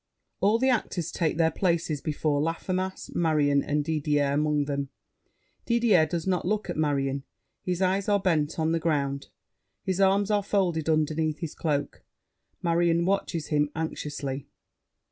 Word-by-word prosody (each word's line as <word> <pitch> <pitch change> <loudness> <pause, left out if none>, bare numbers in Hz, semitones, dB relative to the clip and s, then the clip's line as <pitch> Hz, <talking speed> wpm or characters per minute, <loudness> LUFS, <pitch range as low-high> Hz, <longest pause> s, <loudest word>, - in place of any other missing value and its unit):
[All 210 +3 +3
the 260 +3 +2
actors 190 -8 -1
take 160 -3 -1
their 165 -1 +3
places 165 -4 0
before 150 -1 0
Laffemas. 185 +4 -3
Marion 150 -4 +2
and 145 0 -1
Didier 150 -2 +1
among 150 0 +1
them. 140 -1 -3 0.8
Didier 230 -9 +4
does 170 0 -3
not 185 -2 0
look 210 +2 -1
at - - -5
Marion; 140 -3 0 0.4
his 180 0 -1
eyes 190 +2 +1
are 205 -1 +4
bent 165 -5 0
on 160 0 +1
the 165 - +1
ground; 140 -4 -1 0.6
his 190 0 -1
arms 195 +2 +3
are 205 -1 +3
folded 180 -6 0
underneath 155 0 +1
his 165 -4 -5
cloak. 145 -3 -2 0.6
Marion 170 0 +2
watches 185 -4 -1
him 150 -1 +2
anxiously. 145 -4 -4
160 Hz, 145 wpm, -27 LUFS, 150-185 Hz, 0.8 s, Didier